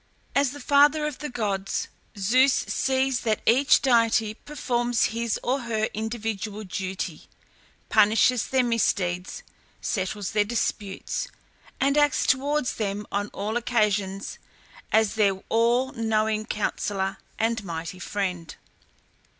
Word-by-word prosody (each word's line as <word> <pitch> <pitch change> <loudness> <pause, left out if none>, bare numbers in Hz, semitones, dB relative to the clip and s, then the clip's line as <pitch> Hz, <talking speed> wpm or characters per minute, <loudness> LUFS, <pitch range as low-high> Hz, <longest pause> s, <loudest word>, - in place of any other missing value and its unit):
As 280 -1 +3
the 290 +3 -8
father 290 +3 +4
of 300 -3 -4
the 300 +1 -4
gods, 200 -5 -2 0.3
Zeus 255 +8 +4
sees 265 -1 0
that 220 -3 0
each 265 +5 +5
deity 230 -4 +3
performs 240 -3 -1
his 230 -1 -1
or 260 +3 +1
her 220 -2 -1
individual 215 -1 -4
duty, 185 -3 -5 0.6
punishes 220 +3 +4
their 260 -1 +2
misdeeds, 200 - 0 0.4
settles 200 0 -2
their 210 -1 +3
disputes, 205 - -3 0.5
and 280 +2 +3
acts 290 -2 +3
towards 280 +1 +1
them 205 -1 -2
on 205 +1 -1
all 210 +2 -4
occasions 210 -5 -1 0.5
as 220 -1 +3
their 205 -3 +3
all 240 +3 +2
knowing 215 -1 0
counsellor 195 -2 -2 0.2
and 225 0 0
mighty 170 0 -6
friend. 180 -4 -3
220 Hz, 120 wpm, -25 LUFS, 200-250 Hz, 0.6 s, each